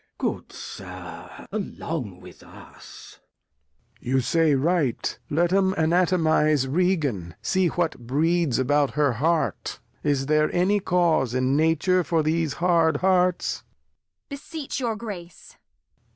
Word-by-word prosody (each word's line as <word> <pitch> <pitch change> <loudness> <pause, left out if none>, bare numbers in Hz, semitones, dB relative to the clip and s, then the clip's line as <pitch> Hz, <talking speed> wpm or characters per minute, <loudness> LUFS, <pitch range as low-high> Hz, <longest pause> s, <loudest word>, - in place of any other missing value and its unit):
Good - - -3
Sir, - - -9
along 155 - -5
with - - -14
us. - - -14 0.8
Lear. 125 - -3
You - - +4
say 160 +3 +2
right, 150 -3 0
let 170 +4 +1
'em 190 0 +2
Anatomize 160 -4 +2
Regan, 140 - 0
for 190 -1 +1
what 170 -6 -1
breeds 160 +1 +1
about 145 +2 +1
her 145 -3 +2
Heart; 160 +7 -1 0.2
is 140 -2 0
there 155 +1 +2
any 190 +4 +2
Cause 165 - +1
in 130 +1 +1
Nature 160 +4 +2
for 165 -2 0
these 160 -1 0
hard 170 -3 +2
Hearts 180 -1 +1
160 Hz, 110 wpm, -24 LUFS, 140-175 Hz, 0.8 s, You